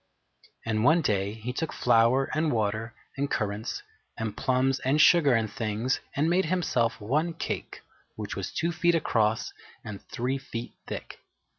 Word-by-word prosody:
And 110 -1 0
one 160 +6 +5
day 100 -3 0
he 115 +3 -5
took 160 +4 -2
flour 120 +3 +3
and 155 0 +1
water 110 0 -1 0.2
and 140 +1 -1
currants 105 +1 -2 0.3
and 110 -2 -3
plums 130 +1 +1
and 135 +4 +1
sugar 155 -5 +6
and 110 -1 +1
things, 115 +2 -1 0.2
and 150 +3 +2
made 180 +3 +3
himself 155 -9 0
one 150 +11 0
cake - - -4 0.3
which 105 -2 -5
was 95 - -4
two 170 +1 -1
feet 175 0 +2
across 110 -8 +1 0.3
and 105 -2 -7
three 130 +3 -1
feet 120 -3 -6
thick. - - -7
125 Hz, 155 wpm, -28 LUFS, 110-150 Hz, 0.3 s, sugar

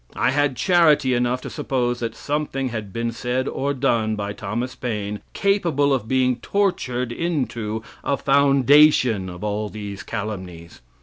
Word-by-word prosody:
I - - +2
had 145 -1 +1
charity 150 -2 +4
enough 125 +1 0
to - - -6
suppose 120 -2 -1
that 115 -1 -3
something 145 -3 -2
had 110 -4 -5
been 115 +3 -2
said 125 +3 -2
or 140 +1 -1
done 115 -5 +1
by 100 -1 -4
Thomas 120 +6 -4
Paine 105 -5 -4
capable 170 -8 +2
of 120 -5 -1
being 130 0 +2
tortured 125 -8 -1
into 120 -8 -2 0.2
a 140 - 0
foundation 140 -6 +4
of 90 +1 -9
all 105 0 -2
these 100 -2 -7
calumnies. 95 - -6
125 Hz, 145 wpm, -22 LUFS, 110-140 Hz, 0.2 s, charity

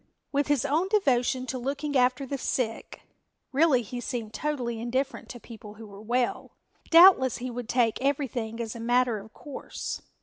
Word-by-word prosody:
With 285 0 +1
his 290 -3 +1
own 310 +6 +1
devotion 260 - +1
to 255 0 -4
looking 285 +3 -3
after 255 +2 +2
the 275 +1 -4
sick 230 -2 -3 0.5
(really 275 -3 +3
he 245 +3 -6
seemed 230 -3 -5
totally 250 -6 -2
indifferent 260 +4 -2
to 240 - -8
people 220 -3 -11
who 225 +1 -11
were 200 -1 -12
well) 240 +3 -1 0.4
doubtless 330 -7 +7
he 250 +1 -5
would 240 -1 -6
take 235 -2 +1
everything 260 -5 -2
as 230 -1 -4
a - - -7
matter 240 -1 +2
of 215 +2 -13
course. 285 +1 -7
250 Hz, 170 wpm, -27 LUFS, 235-280 Hz, 0.5 s, doubtless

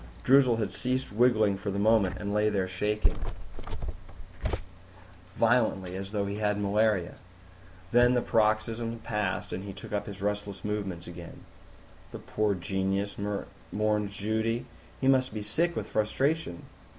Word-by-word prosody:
Droozle 130 -3 +6
had 105 -4 -1
ceased 130 +4 -1
wriggling 110 -3 +4
for 100 +1 -4
the 100 - -2
moment 105 -2 +3
and 100 0 -3
lay 105 0 +3
there 95 -3 0
shaking 105 +3 0 2.2
violently, 110 -6 +2
as 95 +1 -5
though 105 -2 0
he 100 +1 -3
had 105 -1 +1
malaria. 105 -3 +1 0.7
Then 120 +1 +5
the 120 - +3
paroxysm 115 +1 +1
passed 105 -4 -2
and 95 - -3
he 100 -1 -6
took 95 +2 -9
up 105 0 -1
his 100 -1 -7
restless 100 0 -3
movements 100 -5 -3
again. 85 -1 -10 0.7
"The - - -6
poor 105 -2 0
genius," 95 +2 -1 0.5
mourned 105 -1 +1
Judy. 110 +3 -1 0.3
"He 130 - +1
must 130 -4 +3
be 105 - -3
sick 165 +12 +1
with - - -2
frustration." 120 - 0
105 Hz, 140 wpm, -29 LUFS, 100-115 Hz, 2.2 s, Droozle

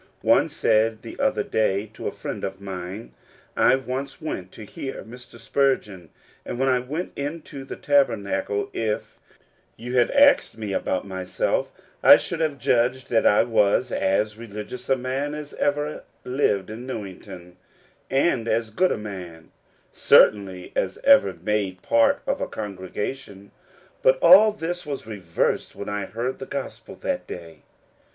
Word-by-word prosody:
One - - +4
said 110 0 +1
the - - -9
other - - +1
day 105 -2 0
to - - -6
a - - -2
friend - - -6
of 95 0 -4
mine: 95 +2 -7 0.2
" - - -30
I - - +5
once 135 +1 -5
went 95 - -5
to 110 - -10
hear 135 +6 -7
Mr. 120 +1 -13
Spurgeon, 115 - -1 0.3
and - - -5
when 135 +1 +1
I 130 -1 +3
went 150 +8 -4
into 145 -1 -6
the 135 - -7
Tabernacle 115 -7 0
if 110 -2 -3 0.6
you 125 +2 -5
had 120 - +4
asked 280 - +4
me 105 -3 -4
about 95 0 -1
myself 95 -1 -2 0.3
I - - +9
should 165 - -5
have 155 -3 0
judged 125 0 +1
that 115 - +4
I 105 - +5
was 105 -3 +2
as 105 +3 0
religious 115 +2 -8
a 135 - +3
man 135 +4 -3
as 150 -1 -8
ever 145 +1 -1 0.2
lived 110 -7 0
in 120 +4 -8
Newington, 95 -6 -8 0.5
and 135 -4 +1
as 115 -1 0
good 185 +11 +2
a - - 0
man, 90 -6 -9 0.4
certainly, 95 -3 +3
as 95 - -1
ever 275 - +6
made 95 0 -2
part 115 0 +3
of - - -1
a - - -1
congregation; 100 +1 -6 0.5
but 130 0 +4
all 195 +7 +8
this 175 -3 -4
was 145 -6 -5
reversed 95 -7 -2
when 100 - -6
I 105 -1 -3
heard 120 +4 -4
the 135 - -7
gospel 140 -1 -6
that - - -2
day. 80 -3 -9
115 Hz, 155 wpm, -24 LUFS, 100-135 Hz, 0.6 s, I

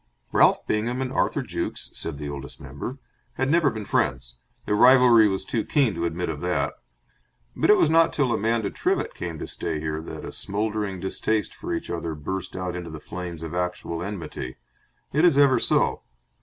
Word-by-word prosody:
Ralph - - +4
Bingham 115 +4 -1
and 130 0 -2
Arthur - - +1
Jukes - - -4
(said 80 -3 -4
the 75 0 -5
Oldest 70 -1 -7
Member) 70 - -6 0.4
had 130 +1 0
never 165 -3 +4
been 110 -4 -6
friends - - -1 0.3
their - - 0
rivalry 125 -1 +7
was 95 -1 -1
too 115 - -1
keen 135 -8 +2
to 85 -1 -2
admit 85 +2 -3
of 75 -3 -4
that 90 0 0 0.8
but - - +1
it 210 - +8
was - - +4
not 165 +1 +4
till 135 -5 +1
Amanda 110 -1 0
Trivett - - -1
came 85 -2 -5
to - - -5
stay 80 -2 -3
here 75 0 -3
that 80 - -8
a - - -6
smouldering 105 -1 -2
distaste 105 +3 -1
for 350 - -7
each 335 -1 -3
other 80 -2 -3
burst 90 +5 -5
out 90 -1 -3
into 90 -1 -5
the 80 -1 -7
flames 85 0 -7
of 80 0 -6
actual 90 -2 -2
enmity. 85 -9 -5 0.6
It 150 +4 +3
is 170 -6 +5
ever 140 -2 +5
so. - - +2
95 Hz, 190 wpm, -25 LUFS, 80-125 Hz, 0.8 s, it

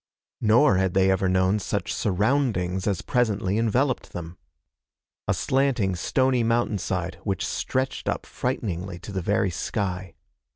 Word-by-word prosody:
Nor 115 +1 +5
had 95 -1 0
they 95 0 +4
ever 95 0 +1
known 95 +2 +2
such - - -2
surroundings 100 -3 0
as 100 -4 0
presently 105 -5 +1
enveloped 125 +4 0
them. 85 0 -7 0.9
A - - +3
slanting, 130 -8 +1
stony 130 +7 +1
mountainside 105 -6 -1
which 95 -4 -1
stretched 130 +1 -2
up - - -2
frighteningly 95 -8 -3
to 95 +4 -9
the 95 -1 -2
very 100 +1 +1
sky. 90 -1 -3
100 Hz, 130 wpm, -25 LUFS, 95-120 Hz, 0.9 s, Nor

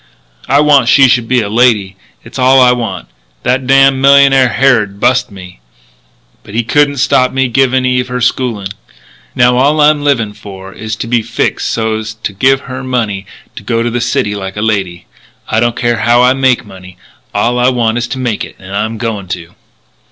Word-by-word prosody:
I 140 +2 +4
want 140 -5 +3
she 135 -2 +5
should 120 -2 +1
be 125 0 +1
a 105 - -3
lady. 105 -3 +1 0.3
It's 120 +3 -10
all 130 +1 +4
I 125 -1 +5
want. 115 -6 -4 0.4
That 130 +1 -1
damned 135 0 +4
millionaire 135 -2 +5
Harrod 110 -8 +1
bust 125 +1 +1
me. 95 -3 -13 0.8
But 100 - -12
he 115 - 0
couldn't 145 +4 +1
stop 130 -1 +2
me 135 0 0
giving 130 +1 +1
Eve 125 0 0
her 125 0 -4
schooling. 115 -5 -1
And - - -9 0.6
now 125 0 +3
all 145 +4 +2
I'm 150 0 +3
livin' 120 -8 0
for 95 -2 -11
is 110 0 -6
to 115 - -6
be 120 0 +1
fixed - - -2
so's 110 -1 -3
to 110 -2 -6
give 130 +7 +2
her 130 0 -8
money 110 -7 -3 0.3
to - - -8
go 115 -1 -2
to 120 - -2
the 120 +1 -2
city 105 -3 -1
like 95 -1 -6
a 105 - -2
lady. 95 -5 -2 0.4
I 110 - 0
don't 120 0 0
care 120 -1 -1
how 120 +2 +2
I 125 +1 +4
make 130 -2 +1
money; 90 -2 -14 0.3
all 120 +1 0
I 125 +1 +3
want 120 -2 0
is 120 - -3
to 125 - -5
make 120 -4 -2
it. - - -10
And 95 +1 -9
I'm 110 +2 -2
a - - -8
going 110 -4 -4
to." 90 -1 -7
120 Hz, 205 wpm, -12 LUFS, 105-130 Hz, 0.8 s, she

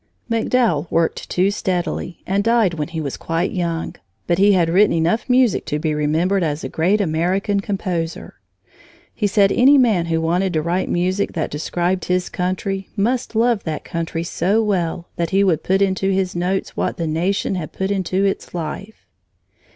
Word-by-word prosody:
MacDowell 225 - +1
worked 165 0 0
too 185 +2 +2
steadily 180 -3 -3
and 195 +2 0
died 230 -5 +3
when 150 -3 -3
he 170 -1 -5
was 140 -4 -4
quite 165 +2 -1
young, 170 -3 -3 0.3
but 175 +1 +1
he 200 +1 +5
had 175 -3 +3
written 195 +5 +4
enough 170 +10 0
music 250 -3 +3
to 150 - -2
be 155 0 -1
remembered 160 +6 +1
as 155 -2 -2
a - - -4
great 185 +6 +1
American 190 +3 0
composer. 185 -5 -3 0.8
He 210 - 0
said 200 -1 +3
any 275 +4 +6
man 215 -10 +3
who 165 -1 0
wanted 175 +3 0
to 155 - +1
write 175 +3 -1
music 185 +3 0
that 160 -3 -2
described 175 +5 -1
his 180 0 0
country 190 +1 -3
must 230 +3 -1
love 230 -1 +2
that 155 -2 -3
country 165 0 -3
so 195 +6 +1
well 175 -4 -1
that 170 -1 -1
he 195 +1 +3
would 175 -6 +2
put 195 +1 +2
into 190 0 0
his 190 -1 0
notes 180 +2 -2
what - - -2
the 170 - -2
nation 175 +6 0
had 175 -5 -4
put 190 +1 -2
into 190 0 0
its 195 -2 -2
life. 175 +6 -6
185 Hz, 180 wpm, -20 LUFS, 165-200 Hz, 0.8 s, any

